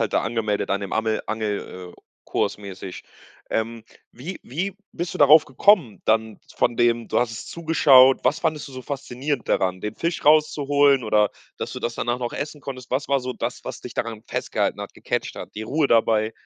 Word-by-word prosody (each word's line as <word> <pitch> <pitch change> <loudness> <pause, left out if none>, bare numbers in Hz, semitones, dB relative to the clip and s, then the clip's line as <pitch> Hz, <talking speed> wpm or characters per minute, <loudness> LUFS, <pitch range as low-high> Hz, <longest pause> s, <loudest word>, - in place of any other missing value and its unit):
halt 110 - -2
angemeldet, 110 -2 0
an 100 +1 +1
dem 100 - -6
Amel 110 0 0
Angel 105 -4 -4
äh, - - -20 0.2
Kurs - - -1
mäßig? 95 -2 -8 0.5
Ähm, 115 0 -2 0.3
wie 165 +10 -8
wie 185 +9 -4 0.2
bist 170 0 -4
du - - -5
darauf 150 +2 +7
gekommen, 135 - +3
dann 110 -1 +1 0.2
von 120 - +1
dem, 120 -1 +2
du - - +1
hast 120 -2 0
es 110 - -7
zugeschaut. 140 -6 +5
Was 145 +6 +2
fandest 155 -3 -1
du - - -13
so 130 - -7
faszinierend 140 -1 -4
daran, 95 -1 +1
den 105 +1 -4
Fisch 170 0 -3
raus 155 0 +6
zu 145 - -4
holen, 140 -3 +4
oder, 105 -1 +3 0.3
dass - - -4
du - - -5
das 120 0 -3
danach 120 +1 -1
noch 120 -1 -3
essen 150 0 -5
konntest? 130 -4 -8
Was 130 +3 -1
war 140 -1 +2
so 125 0 -4
das, - - -4
was - - -6
dich - - -8
daran 115 -2 -4
festgehalten - - -2
hat, - - -8
gecatcht - - -3
hat, - - -9
die 110 - -5
Ruhe 145 +6 +1
dabei? 110 -2 +2
120 Hz, 205 wpm, -23 LUFS, 110-145 Hz, 0.5 s, darauf